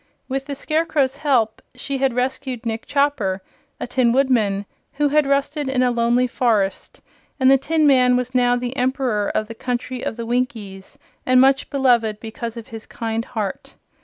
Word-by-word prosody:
With 270 +1 -3
the 285 - -4
Scarecrow's 300 -3 0
help 250 -8 +1
she 270 +2 -4
had 265 -2 +1
rescued 250 -1 -2
Nick 225 0 -4
Chopper, 275 -10 0 0.4
a - - -3
Tin 245 -1 +2
Woodman, 230 -7 +1 0.3
who 290 +1 +1
had 300 0 +3
rusted 280 +1 0
in 255 -1 +1
a 250 - +2
lonely 240 +1 +2
forest, 220 -6 -1 0.4
and 260 0 +5
the 270 - +7
tin 315 +3 +1
man 250 -3 +5
was 250 0 -3
now 245 -1 +3
the 245 +1 -4
Emperor 250 -5 0
of 215 - 0
the 230 - -7
Country 250 +1 -4
of 220 - -3
the 235 - -4
Winkies 225 -6 -3 0.3
and 255 0 +4
much 270 +1 +3
beloved 240 -6 +2
because 230 +1 -6
of 230 - -9
his 225 -1 -9
kind 225 0 -3
heart. 215 -6 -5
250 Hz, 175 wpm, -21 LUFS, 230-270 Hz, 0.4 s, the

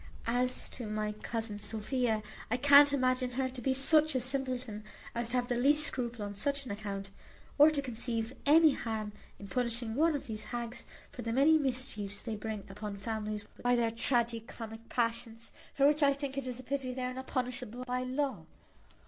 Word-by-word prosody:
As 250 +2 +1
to 240 - -6
my 215 0 -2
cousin 215 0 -4
Sophia, 220 +1 -1 0.3
I 245 - +1
can't 285 +1 +8
imagine 255 -2 +1
her 260 +1 0
to 255 -1 -8
be 265 - +1
such 305 +3 +4
a - - +3
simpleton 255 -4 -1 0.3
as 235 0 -2
to 250 - +1
have 245 0 0
the 245 - 0
least 290 +5 +5
scruple 240 -5 -2
on 205 - -5
such 280 +6 -1
an 235 - -5
account, 200 -1 -5 0.5
or 295 +2 +9
to 290 -2 -1
conceive 235 -1 -2
any 315 +1 +7
harm 220 -4 -3 0.3
in 200 - -9
punishing 235 -1 -1
one 315 +5 +3
of 285 - -4
these 215 -3 -4
haggs 240 +1 -5 0.3
for 245 - -7
the 230 -1 -3
many 290 +6 +5
mischiefs 245 -7 -1
they 225 -3 -3
bring 215 -1 -5
upon 200 +1 -6
families 215 0 -3 0.2
by 245 0 +3
their 230 -1 +1
tragi 235 0 +1
comic 225 0 -9
passions; 230 -1 -2 0.2
for 275 - +2
which 300 +2 +4
I 280 -1 +5
think 275 -1 -5
it 275 -2 -3
is 250 -1 -4
a - - -8
pity 260 -1 -2
they 255 - -3
are 250 0 -2
not 260 +1 -7
punishable 250 -1 -3
by 250 0 -1
law. 255 - -2
245 Hz, 195 wpm, -32 LUFS, 220-265 Hz, 0.5 s, or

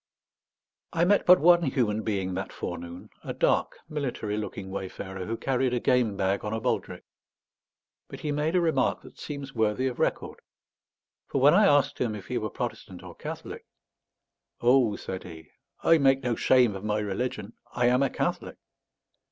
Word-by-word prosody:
I 165 +1 +2
met 205 +2 +3
but 180 0 +8
one 175 +2 +6
human 120 -8 0
being 95 -4 -2
that 95 +2 -4
forenoon, 85 0 -7
a - - -5
dark - - +1
military 125 -8 -3
looking 100 -2 -5
wayfarer, 95 -1 -6
who 115 +1 -3
carried 130 -1 0
a - - 0
game 120 -6 +1
bag 95 0 0
on 105 +1 -3
a 110 - -1
baldric; - - -2 1.0
but - - -10
he 150 - -2
made 150 +4 0
a 180 - +4
remark 160 -6 +1
that - - -15
seems 140 -2 -7
worthy 110 +2 0
of 130 -2 -3
record. - - -1 0.9
For 140 - -1
when 140 +3 +6
I 200 +2 +6
asked 145 -5 +3
him 115 -3 -1
if 100 - -9
he - - -2
were - - -3
Protestant - - -6
or - - -10
Catholic - - -8 0.9
"Oh," 120 -3 +4
said 95 -2 -6
he, 80 -3 -12 0.3
"I 165 -1 +5
make 135 -1 +3
no 120 -2 0
shame 125 -5 +3
of 95 - -7
my 105 0 0
religion. 105 +1 -3 0.2
I 120 - 0
am 125 +2 +3
a 140 - +2
Catholic." - - -3
120 Hz, 175 wpm, -27 LUFS, 100-140 Hz, 1.0 s, but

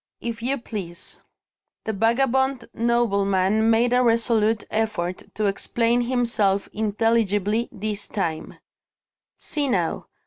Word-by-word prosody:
"If 235 -1 -5
you 265 +4 0
please." 190 -8 -7 0.6
The 220 - -1
vagabond 255 +4 +1
nobleman 215 -3 +2
made 235 +2 +3
a 250 - +4
resolute 230 -2 +2
effort 210 -5 -1
to 215 - -1
explain 235 +4 +1
himself 235 -5 +1
intelligibly, 215 0 +1
this 210 0 -4
time: 165 -6 -3 0.8
"See 295 -2 -1
now! 175 -8 -1
225 Hz, 105 wpm, -23 LUFS, 200-235 Hz, 0.8 s, a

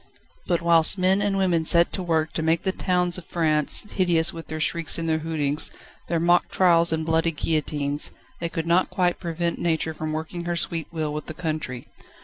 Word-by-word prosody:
But 170 -1 0
whilst 170 +2 +4
men 190 +2 +2
and 205 -1 0
women 180 -4 +1
set 170 +1 +4
to 190 - -2
work 160 -4 -1
to - - -2
make 160 +1 0
the 190 - 0
towns 180 -1 0
of 175 - -14
France 155 -3 +3
hideous 170 -3 +1
with 165 -1 -9
their 155 - -5
shrieks 165 0 0
and 165 -1 -3
their 160 -1 0
hootings, 150 -2 +1 0.4
their 170 -1 -1
mock 175 +1 +2
trials 170 -2 +3
and 160 -1 -1
bloody 160 +1 +1
guillotines, 150 -2 0 0.3
they 170 - -3
could 165 -1 -4
not 170 +2 +2
quite 180 -1 0
prevent 170 -1 -3
Nature 160 -1 -1
from 155 0 -5
working 160 +2 -5
her 175 0 -2
sweet 165 -2 -2
will 155 -3 -3
with 150 - -5
the 155 - -8
country. 155 -7 -4
165 Hz, 200 wpm, -24 LUFS, 155-175 Hz, 0.4 s, whilst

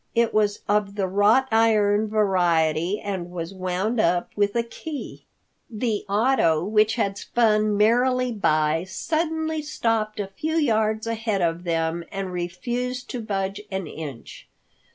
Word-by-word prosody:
It 230 0 +2
was 210 -1 +1
of 205 -1 +1
the 200 -2 0
wrought 205 +7 +3
iron 215 -2 +3
variety, 180 -3 +1
and 190 -4 -4
was 175 0 -6
wound 190 +5 -2
up 175 -2 +1
with 205 0 +1
a 235 - +2
key. 290 +5 -8 0.4
The 220 -2 -2
auto 200 -7 +2
which 215 +1 +3
had 200 -4 -1
spun 215 -3 +2
merrily 250 +4 +3
by 155 -6 +1
suddenly 315 - -2
stopped 225 -7 -1
a 205 - -1
few 305 +12 -4
yards 220 -7 +1
ahead 225 -4 -1
of 170 +1 -1
them 165 0 -1
and 195 -1 -4
refused 240 +9 -3
to 245 - -4
budge 195 -1 -3
an 190 -1 -3
inch. 150 -6 -9
210 Hz, 140 wpm, -24 LUFS, 185-230 Hz, 0.4 s, wrought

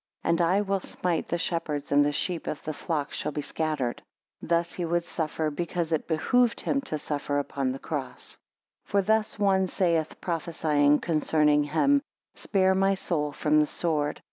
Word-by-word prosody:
And, 170 +1 +2
I 180 +4 +3
will 195 -1 0
smite 180 -2 -2
the 170 - -1
shepherd, 160 -4 -2
and 145 0 +5
the 145 - +1
sheep 170 +3 -2
of 150 - -4
the 155 - -3
flock 150 -2 -3
shall - - -2
be 150 - -3
scattered. 150 -7 -2 0.4
17 - - -10
Thus 170 0 +1
he 180 - -3
would 170 0 0
suffer, 160 -2 -2
because 170 +1 -3
it 160 - 0
behoved 230 +9 +2
him 275 - 0
to 155 - -1
suffer 145 -1 -2
upon 140 -2 -1
the 130 - -4
cross. 135 -3 -6 0.5
18 - - -26
For 200 - +3
thus 220 +2 +1
one 190 -2 +3
saith, 170 -4 0
prophesying 155 -4 +1
concerning 150 -2 +2
him; 275 - +3 0.3
Spare 190 -2 +2
my 195 +1 +2
soul 150 -6 -1
from 150 +1 +2
the 150 - +3
sword. 150 -3 -1
165 Hz, 180 wpm, -27 LUFS, 150-180 Hz, 0.5 s, and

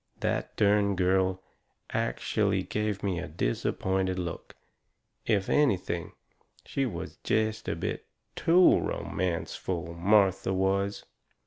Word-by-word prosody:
That - - -1
dern 100 -1 +3
girl 95 0 +1 0.5
ackshellay - - 0
give 105 -2 -2
me 95 -4 0
a - - -5
disappointed 95 +8 -1
look! 85 -2 -5 0.7
If 100 -3 +2
anything, 95 - +1 0.5
she 135 -1 -1
was 115 - -6
jest 110 0 -1
a - - -1
bit - - -4 0.3
TOO 175 +2 +5
romanceful, 85 -1 -3
Martha 95 +1 +3
was. 100 +1 0
95 Hz, 105 wpm, -28 LUFS, 90-105 Hz, 0.7 s, TOO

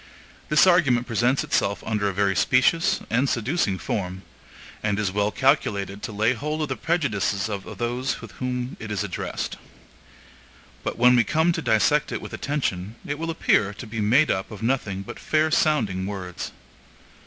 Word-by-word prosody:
This 150 +3 +6
argument 140 -10 +4
presents 120 +3 +1
itself 100 -2 0
under 105 -2 0
a - - -1
very 100 0 +1
specious 130 - +3
and 130 +4 +2
seducing 120 - 0
form; 95 -1 -4 0.6
and 105 -2 0
is 105 -3 0
well 105 +1 +1
calculated 105 -7 +1
to - - -5
lay 110 +4 +2
hold 150 +5 -3
of 150 - -3
the 130 - -1
prejudices 110 - 0
of 100 -3 -6
those 120 +2 -1
to - - -9
whom 125 +3 -4
it 110 - -7
is 105 -4 -1
addressed. - - -4 1.3
But - - -3
when 125 +1 +6
we 120 - +5
come 160 +10 +2
to 165 - -2
dissect 130 +4 +2
it - - -2
with - - -9
attention, 110 -8 -2
it 145 +1 -3
will 165 0 -3
appear 105 -10 +2
to 125 - -8
be 110 0 -4
made 130 +9 +4
up 95 - -2
of 105 0 -9
nothing 110 -6 -1
but - - -9
fair 155 0 +1
sounding 105 - +1
words. 95 -3 -5
115 Hz, 175 wpm, -24 LUFS, 100-140 Hz, 1.3 s, This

